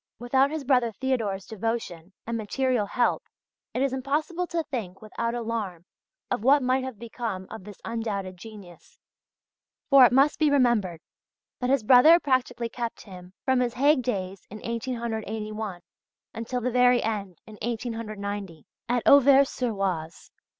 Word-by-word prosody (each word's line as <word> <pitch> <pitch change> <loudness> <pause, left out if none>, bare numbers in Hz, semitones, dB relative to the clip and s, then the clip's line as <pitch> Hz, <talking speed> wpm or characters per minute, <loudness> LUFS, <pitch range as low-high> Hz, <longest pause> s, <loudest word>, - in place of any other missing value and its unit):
Without 265 +3 +2
his 310 -1 -4
brother 250 -3 +2
Theodor's 220 -6 -2
devotion 220 -6 -4
and 230 - -3
material 230 0 0
help 240 +3 +1 0.5
it 255 - -1
is 275 -1 0
impossible 305 +7 -2
to 335 -1 -2
think 215 - -6
without 230 +2 -4
alarm 220 -7 -4 0.5
of 245 -3 -1
what 275 +2 +5
might 255 +1 +1
have 260 -4 -6
become 225 -4 -5
of 220 -4 -8
this 210 -2 -11
undoubted 210 -5 -3
genius. 195 -3 -13 0.9
For 275 -1 +9
it 245 - +7
must 275 +4 +3
be 310 -2 +4
remembered 235 - +2 0.6
that 250 - -1
his 270 -4 +2
brother 265 +9 +7
practically 255 -5 0
kept 235 0 -5
him 180 -2 -12
from 260 -1 +3
his 245 -1 -1
Hague 285 +2 +4
days 195 -6 -4
in 210 - -8
1881 220 -4 -4 0.5
until 240 +2 -4
the 250 +2 -1
very 250 0 +4
end 200 -5 -3
in 215 -1 -13
1890, 210 - -5 0.2
at 245 -1 0
Auvers 280 0 +6
sur 250 -2 -2
Oise. 180 -6 -4
230 Hz, 150 wpm, -26 LUFS, 205-255 Hz, 0.9 s, For